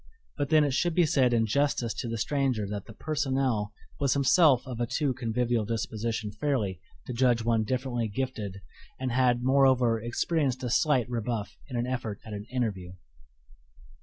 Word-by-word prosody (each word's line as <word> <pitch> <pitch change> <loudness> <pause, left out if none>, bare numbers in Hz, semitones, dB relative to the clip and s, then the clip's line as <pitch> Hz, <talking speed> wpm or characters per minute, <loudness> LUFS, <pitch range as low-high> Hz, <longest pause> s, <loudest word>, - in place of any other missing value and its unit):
But 145 -2 -2
then 155 -1 +5
it 145 -2 0
should 170 +4 +1
be 175 - +5
said 130 -4 +3
in 115 -1 +3
justice 125 -1 0
to - - -3
the 115 - -3
stranger 130 -2 0
that 100 -1 -5
the - - -10
personnel 135 -8 -1 0.3
was 140 -1 +2
himself 140 -1 +4
of 125 -3 -6
a 120 - 0
too 140 +1 0
convivial 120 -1 0
disposition 110 0 -3
fairly 105 - -1 0.2
to 125 - -5
judge 120 -1 +2
one 115 -2 +2
differently 125 -1 -1
gifted, 105 -4 -4 0.4
and 130 -1 -2
had, 125 -1 +2
moreover, 130 -4 +3
experienced 130 +3 -1
a 125 - -2
slight 135 -4 +2
rebuff 115 -3 -3
in 125 -4 -4
an 120 - 0
effort 120 -5 -3
at 110 - -7
an 105 0 -6
"interview." 100 -8 -2
125 Hz, 170 wpm, -28 LUFS, 110-135 Hz, 0.4 s, then